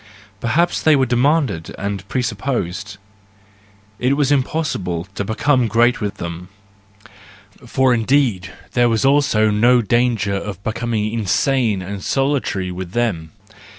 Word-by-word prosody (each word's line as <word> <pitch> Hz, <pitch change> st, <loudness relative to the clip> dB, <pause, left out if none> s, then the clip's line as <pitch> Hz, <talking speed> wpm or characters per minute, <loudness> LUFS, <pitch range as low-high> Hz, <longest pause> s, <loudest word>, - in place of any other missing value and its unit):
Perhaps 165 Hz, -, +1 dB
they 155 Hz, -1 st, +5 dB
were 135 Hz, -2 st, +3 dB
demanded 130 Hz, -, 0 dB
and 100 Hz, -1 st, -4 dB
presupposed; 105 Hz, -5 st, -3 dB, 1.0 s
it 130 Hz, +3 st, +1 dB
was 145 Hz, -2 st, +1 dB
impossible 130 Hz, -, -1 dB
to 100 Hz, -, -3 dB
become 125 Hz, +4 st, +1 dB
great 120 Hz, +3 st, +2 dB
with 100 Hz, -1 st, -3 dB
them, 85 Hz, +1 st, -7 dB, 1.2 s
for 130 Hz, +1 st, +2 dB
indeed 115 Hz, -6 st, +1 dB, 0.2 s
there 120 Hz, -1 st, +3 dB
was 115 Hz, +3 st, +1 dB
also 135 Hz, -6 st, +3 dB
no 120 Hz, +4 st, +4 dB
danger 115 Hz, -2 st, +1 dB
of 100 Hz, -1 st, -5 dB
becoming 110 Hz, -1 st, -2 dB
insane 115 Hz, -1 st, +1 dB
and 100 Hz, 0 st, -6 dB
solitary 135 Hz, -9 st, -1 dB
with 90 Hz, 0 st, -7 dB
them. 100 Hz, -10 st, -1 dB
115 Hz, 120 wpm, -19 LUFS, 100-130 Hz, 1.2 s, they